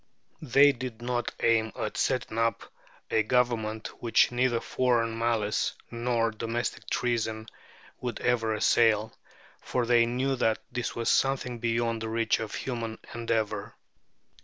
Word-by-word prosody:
They 145 0 +6
did 125 -4 -6
not 120 -1 -1
aim 110 -1 +3
at - - -4
setting 110 - -1
up 115 0 +1 0.5
a 110 - +4
government 110 -2 -1
which 115 0 +3
neither 120 -1 +1
foreign 115 -3 +1
malice 115 -2 0 0.2
nor 115 -1 0
domestic 115 +2 -3
treason, 110 -2 -1 0.5
would 125 -1 -4
ever 115 -3 +1
assail, 110 0 +3 0.5
for 125 -1 -1
they 115 -1 +4
knew 130 +3 0
that 110 -2 +2
this 125 -1 -3
was 115 -1 -3
something 130 -3 +1
beyond 115 -1 0
the 110 - -3
reach 115 0 +1
of 110 -2 -5
human 115 -3 -4 0.2
endeavour. 115 -2 -2
115 Hz, 135 wpm, -28 LUFS, 110-120 Hz, 0.5 s, They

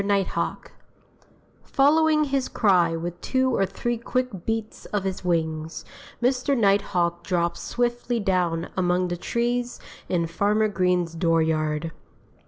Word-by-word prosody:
NIGHTHAWK 200 -1 -1 0.9
Following 305 +2 +3
his 275 -2 0
cry 180 -6 +3
with 175 +1 -5
two 260 -1 +1
or 195 - +2
three 235 +5 -3
quick 240 -6 -3
beats 225 -1 -3
of 205 -2 -2
his 190 -1 -3
wings, 160 -2 -2 0.4
Mr. 260 +2 +2
Nighthawk 190 -5 +1
dropped 170 -2 0
swiftly 240 0 -1
down 180 -4 0
among 180 0 +1
the 175 - -1
trees 240 +4 -1 0.3
in 170 -2 +1
Farmer 210 +6 +1
Green's 180 -3 +1
dooryard. 160 -1 +1
195 Hz, 120 wpm, -25 LUFS, 170-240 Hz, 0.9 s, Following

